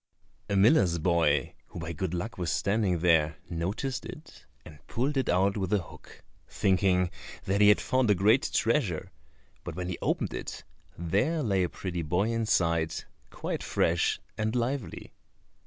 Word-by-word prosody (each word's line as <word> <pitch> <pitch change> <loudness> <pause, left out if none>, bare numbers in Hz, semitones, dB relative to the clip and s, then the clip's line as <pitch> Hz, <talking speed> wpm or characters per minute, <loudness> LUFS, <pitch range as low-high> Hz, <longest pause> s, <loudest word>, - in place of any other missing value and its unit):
A 100 - 0
miller's 95 - +4
boy, 80 -5 +1
who - - -9
by 85 0 -5
good 90 +1 -3
luck 90 +4 -5
was 85 -2 -1
standing 100 -4 +1
there, 80 -3 +3
noticed 100 +11 -3
it - - -11 0.2
and 75 -2 -12
pulled 135 +5 -1
it 135 - 0
out 95 +3 +2
with 95 -3 -2
a 105 - +4
hook, 90 - -11 0.3
thinking 90 -1 +2 0.3
that 100 +2 0
he 105 - +7
had 105 - +5
found 130 -3 +1
a 105 - +5
great 105 +8 +3
treasure, 115 - 0 0.5
but - - -6
when 90 0 -4
he 90 - -4
opened - - -1
it - - -6 0.3
there 105 - 0
lay 100 -5 +1
a 90 - 0
pretty 90 -3 -4
boy 90 +8 0
inside, 85 -8 +1 0.3
quite - - -4
fresh 85 +1 +1 0.2
and 110 +2 -1
lively. 125 +1 -3
95 Hz, 160 wpm, -28 LUFS, 85-110 Hz, 0.5 s, he